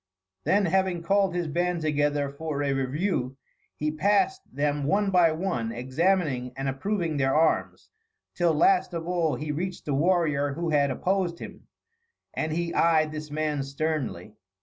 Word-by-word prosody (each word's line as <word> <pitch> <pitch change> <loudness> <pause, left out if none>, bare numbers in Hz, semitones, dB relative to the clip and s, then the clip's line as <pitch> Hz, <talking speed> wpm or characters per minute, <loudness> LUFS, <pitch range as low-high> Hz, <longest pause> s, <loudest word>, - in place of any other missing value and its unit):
Then, 200 0 +3
having 180 -1 +1
called 195 0 +2
his 175 -2 -1
band 175 +2 -1
together 145 -1 +1
for 145 +1 -4
a 140 -1 +1
review, 135 0 -1 0.4
he 150 0 -1
passed 210 - +1
them 145 0 -1
one 200 +5 +1
by 175 -3 +5
one, 155 -9 -2
examining 130 +1 0
and 135 0 -3
approving 165 +3 -1
their 135 -1 +1
arms, 160 +1 +1 0.4
till, 170 -3 +2
last 185 +3 +3
of 165 0 -4
all, 170 -5 +1
he 150 +4 -4
reached 180 +5 -4
the 145 - -1
warrior 150 -2 +1
who 170 +2 -2
had 145 -2 +3
opposed 180 +4 -1
him; - - -10 0.7
and 155 0 -2
he 170 +1 -2
eyed 155 -2 +3
this 155 0 -6
man 150 -1 -1
sternly. 135 - -3
155 Hz, 155 wpm, -26 LUFS, 140-180 Hz, 0.7 s, by